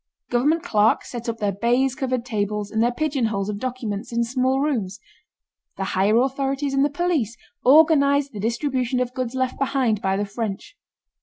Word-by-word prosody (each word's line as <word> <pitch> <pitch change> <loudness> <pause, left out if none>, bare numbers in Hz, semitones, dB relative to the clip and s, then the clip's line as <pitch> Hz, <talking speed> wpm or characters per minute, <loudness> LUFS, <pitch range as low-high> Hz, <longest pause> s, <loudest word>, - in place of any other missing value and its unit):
Government 295 +7 +2
clerks 215 +1 +2
set 235 -1 -5
up 230 - -3
their 205 -3 0
baize 240 +6 +1
covered 255 -3 -2
tables 210 -3 -2
and 220 - 0
their 240 +1 +3
pigeonholes 240 -8 -1
of 205 -1 -4
documents 240 -4 -4
in 235 0 +1
small 260 +2 0
rooms. 225 -9 -1 0.8
The 195 - -2
higher 200 +4 +3
authorities 275 +1 -1
and 275 0 +3
the 290 - +2
police 285 - -1 0.3
organized 280 -1 +5
the 210 - -6
distribution 250 +3 -1
of 250 0 -2
goods 255 -1 -3
left 260 -1 -1
behind 255 -6 +1
by 190 0 0
the 205 - -1
French. 205 - -5
245 Hz, 170 wpm, -23 LUFS, 215-270 Hz, 0.8 s, organized